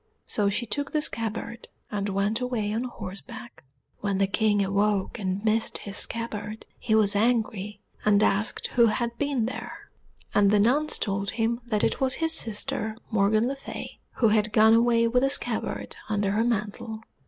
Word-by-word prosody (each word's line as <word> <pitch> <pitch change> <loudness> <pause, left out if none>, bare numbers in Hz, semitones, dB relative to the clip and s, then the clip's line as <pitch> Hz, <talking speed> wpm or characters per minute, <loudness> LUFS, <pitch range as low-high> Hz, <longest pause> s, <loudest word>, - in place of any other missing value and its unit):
So 205 -2 +1
she 225 +5 -1
took 285 +4 -3
the 305 - +2
scabbard, 230 0 -2 0.2
and 205 -1 -2
went 200 +4 0
away 230 -5 -2
on 230 +3 -1
horseback. 235 +2 -9 0.4
When 200 -2 -1
the 195 - +3
King 205 0 +1
awoke 200 +2 0
and 195 +1 -3
missed 220 +1 +1
his 200 -1 -7
scabbard, 215 -2 -3
he 220 - +1
was 210 -1 +4
angry, 210 -2 0 0.2
and 210 0 +4
asked 205 +2 +1
who 235 -1 +5
had 235 +2 -1
been 280 -5 0
there; 250 - -7 0.4
and 205 -1 +4
the 205 0 +4
nuns 275 +9 +2
told 200 -1 -2
him 230 +1 0
that 215 -3 0
it - - 0
was 260 -1 +3
his 325 0 +1
sister 220 -4 0
Morgan 215 +2 +2
le 275 - -2
Fay, 275 - -8
who 230 - +3
had 210 0 +2
gone 220 +1 +6
away 230 0 +4
with 250 +2 +2
a 270 - +3
scabbard 275 - -1
under 205 -2 0
her 215 +3 +1
mantle. 220 -1 -3
220 Hz, 175 wpm, -26 LUFS, 205-235 Hz, 0.4 s, gone